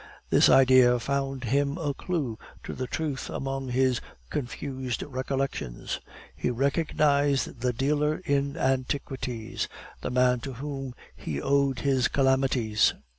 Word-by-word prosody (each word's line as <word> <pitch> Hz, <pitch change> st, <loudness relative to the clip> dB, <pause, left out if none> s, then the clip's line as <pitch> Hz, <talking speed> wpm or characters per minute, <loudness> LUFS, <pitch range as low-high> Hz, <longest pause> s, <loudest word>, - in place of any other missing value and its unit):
This -, -, +6 dB
idea 130 Hz, -2 st, +6 dB
found 135 Hz, +1 st, -2 dB
him 140 Hz, +5 st, +1 dB
a 150 Hz, -5 st, -1 dB
clue 140 Hz, -10 st, -3 dB, 0.2 s
to -, -, -5 dB
the 130 Hz, -, -4 dB
truth 150 Hz, -3 st, -3 dB
among 135 Hz, 0 st, -3 dB
his 130 Hz, -1 st, +2 dB, 0.3 s
confused 130 Hz, -3 st, -3 dB
recollections; 130 Hz, -, -3 dB, 0.4 s
he -, -, -1 dB
recognized 140 Hz, 0 st, +1 dB
the 125 Hz, 0 st, +2 dB
dealer 150 Hz, +5 st, +1 dB
in 140 Hz, +2 st, 0 dB
antiquities, 130 Hz, -4 st, -2 dB, 0.3 s
the -, -, -3 dB
man 125 Hz, 0 st, +3 dB
to 135 Hz, +2 st, -6 dB
whom 135 Hz, 0 st, -5 dB, 0.2 s
he 75 Hz, -3 st, -4 dB
owed 140 Hz, -, +1 dB
his 135 Hz, -3 st, +2 dB
calamities! 130 Hz, -5 st, +2 dB
135 Hz, 125 wpm, -27 LUFS, 125-140 Hz, 0.4 s, This